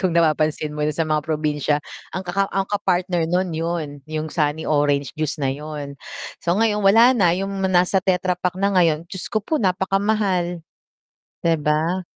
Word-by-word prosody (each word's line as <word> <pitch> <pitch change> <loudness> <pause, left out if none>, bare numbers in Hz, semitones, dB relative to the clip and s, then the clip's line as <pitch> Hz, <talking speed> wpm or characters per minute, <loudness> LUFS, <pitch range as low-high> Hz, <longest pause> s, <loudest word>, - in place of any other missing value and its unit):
Kung 185 -3 +1
napapansin 155 -2 +1
mo 150 - -5
sa 160 +2 0
mga 155 -1 +1
probinsya 150 -2 0 0.4
ang 190 - -4
kaka 195 +2 0
ang 195 0 -1
ka-partner 185 -4 0
nun 180 0 0
yun 160 -3 -3
yung 155 0 -4
sunny 150 -1 0
orange 145 -3 +1
juice 155 0 -2
na 135 -3 0
yun. 145 -1 -7 0.4
So 170 +1 0
ngayon 215 -1 +2
wala 225 +5 +6
na 180 -8 +3
yung 195 +1 -3 0.2
nasa 185 +1 +3
tetra 180 0 +1
pack 180 0 -1
na 200 +1 +1
ngayon, 165 -3 +3
Diyos 185 +1 -5
ko 215 -3 -2
po 310 -4 0
napakamahal. 190 -2 0 0.7
Di 165 -1 +2
ba? 155 +4 0
170 Hz, 170 wpm, -22 LUFS, 155-190 Hz, 0.7 s, wala